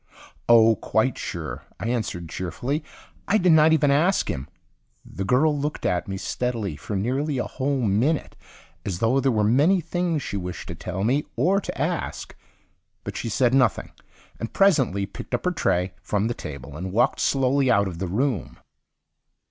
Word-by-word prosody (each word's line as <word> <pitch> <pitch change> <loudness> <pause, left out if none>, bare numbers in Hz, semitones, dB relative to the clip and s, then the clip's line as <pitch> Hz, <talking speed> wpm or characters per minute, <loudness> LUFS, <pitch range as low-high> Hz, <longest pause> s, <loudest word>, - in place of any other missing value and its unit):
"Oh, 115 -2 +6
quite - - +1
sure," - - -5 0.2
I 110 +6 -3
answered 110 -8 -2
cheerfully. 120 - -3 0.4
"I 210 - +4
did 180 -3 +4
not 160 0 +6
even 150 -3 +4
ask 170 +7 +2
him." 65 +1 -5 0.6
The 95 - -5
girl 140 +9 +3
looked 145 +1 -3
at 90 - 0
me 95 0 -4
steadily 115 -5 -2
for 100 +8 -6
nearly 130 +8 -1
a 125 - 0
whole 135 0 -2
minute 120 +9 +1 0.5
as 95 -4 -3
though 115 +7 +2
there 135 0 +2
were 110 -2 +1
many 145 - +4
things 170 -2 -1
she 100 - -3
wished 90 -2 -6
to - - -3
tell 90 +3 -4
me 135 +7 +1
or 185 - +2
to - - -6
ask. - - -3 0.7
But - - -6
she 115 - -3
said 120 +3 +2
nothing, 130 -2 +2 0.5
and 115 - -4
presently 135 - +3
picked 110 - -5
up 120 - -5
her 180 - +2
tray 90 - 0
from 105 0 -1
the 120 - -1
table 70 - -8
and 90 +4 -5
walked 115 +5 +2
slowly 135 0 +2
out 100 -4 +3
of 85 -3 -6
the 95 - -2
room. 115 - -1
120 Hz, 175 wpm, -24 LUFS, 95-145 Hz, 0.7 s, Oh